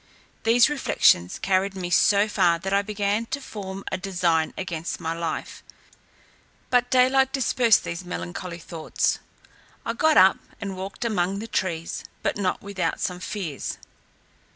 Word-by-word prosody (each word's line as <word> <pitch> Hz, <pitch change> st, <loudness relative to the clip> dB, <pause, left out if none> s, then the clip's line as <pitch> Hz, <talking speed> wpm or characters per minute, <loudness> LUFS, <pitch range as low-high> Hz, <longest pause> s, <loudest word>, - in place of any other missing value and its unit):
These 230 Hz, +1 st, +5 dB
reflections 270 Hz, -, +2 dB
carried 195 Hz, 0 st, 0 dB
me 180 Hz, -2 st, -4 dB
so 205 Hz, +3 st, +4 dB
far, 175 Hz, -5 st, +3 dB
that 190 Hz, +3 st, -4 dB
I 200 Hz, -, +4 dB
began 205 Hz, +2 st, -1 dB
to 285 Hz, -, -3 dB
form 195 Hz, -6 st, -7 dB
a -, -, -2 dB
design 175 Hz, -4 st, +1 dB
against 170 Hz, -3 st, -4 dB
my 165 Hz, -1 st, -2 dB
life; 165 Hz, -1 st, -4 dB, 1.1 s
but 245 Hz, 0 st, +3 dB
daylight 260 Hz, +1 st, +4 dB
dispersed 245 Hz, -4 st, +3 dB
these 170 Hz, +2 st, -5 dB
melancholy 175 Hz, 0 st, -5 dB
thoughts. 165 Hz, -1 st, -2 dB, 0.7 s
I 230 Hz, -, -1 dB
got 315 Hz, +6 st, +3 dB
up, 190 Hz, +1 st, +6 dB, 0.2 s
and 195 Hz, -2 st, -5 dB
walked 195 Hz, +5 st, -6 dB
among 195 Hz, -3 st, 0 dB
the 220 Hz, +3 st, -5 dB
trees, 170 Hz, -6 st, -2 dB, 0.2 s
but -, -, 0 dB
not 190 Hz, -3 st, -1 dB
without 200 Hz, -2 st, -2 dB
some 180 Hz, -1 st, -2 dB
fears. 180 Hz, -7 st, -4 dB
195 Hz, 145 wpm, -25 LUFS, 175-220 Hz, 1.1 s, up